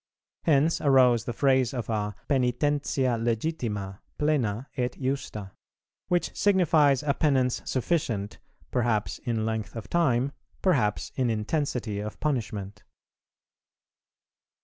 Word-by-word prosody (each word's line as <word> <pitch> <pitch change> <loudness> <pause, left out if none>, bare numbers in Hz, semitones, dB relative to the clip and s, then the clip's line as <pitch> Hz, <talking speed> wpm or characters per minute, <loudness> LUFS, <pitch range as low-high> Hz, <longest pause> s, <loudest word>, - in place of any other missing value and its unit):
Hence 155 +1 +3
arose 125 -5 +4
the - - -2
phrase 130 -1 +2
of 120 -4 -3
a 105 -2 -2
"pœnitentia 130 -2 +1
legitima, 110 -6 -2 0.2
plena, 135 -6 0
et 125 -2 -2
justa;" 130 -7 -3 0.6
which 175 -1 0
signifies 160 -9 +4
a 145 -1 +2
penance 130 -4 +1
sufficient, 120 -7 -1 0.3
perhaps 115 -4 0
in 115 -3 -2
length 110 0 -3
of 115 - -7
time, 140 -6 +2 0.3
perhaps 125 - +1
in 130 -2 +1
intensity 115 -1 -1
of 105 +1 -6
punishment. 105 -8 -3
125 Hz, 105 wpm, -27 LUFS, 110-145 Hz, 0.6 s, arose